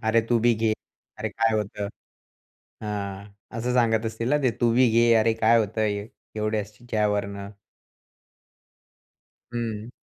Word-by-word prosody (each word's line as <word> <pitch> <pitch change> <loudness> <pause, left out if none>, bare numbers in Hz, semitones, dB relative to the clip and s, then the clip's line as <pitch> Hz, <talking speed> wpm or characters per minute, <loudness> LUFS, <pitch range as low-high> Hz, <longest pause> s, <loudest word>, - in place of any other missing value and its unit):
"अरे, 110 +1 +4
तू 120 -1 +4
बी 120 0 +4
घे. 110 0 +1 0.5
अरे, - - -2
काय 115 0 +1
होतं?" 105 -1 -3 0.9
हां. 100 -1 -4 0.3
असं 125 +2 -1
सांगत 115 -2 +3
असतील 115 +2 -3
ना 150 - +4
ते? 130 - +3
"तू 120 -1 +4
बी 125 -1 +5
घे 115 0 +5
अरे, 115 +1 +3
काय 115 +1 +4
होतंय 105 -1 -1 0.3
एवढ्याशा 105 +1 -1
वरनं?" 100 -1 -3 2.0
हं. 115 -1 -3
110 Hz, 130 wpm, -25 LUFS, 105-115 Hz, 2.0 s, बी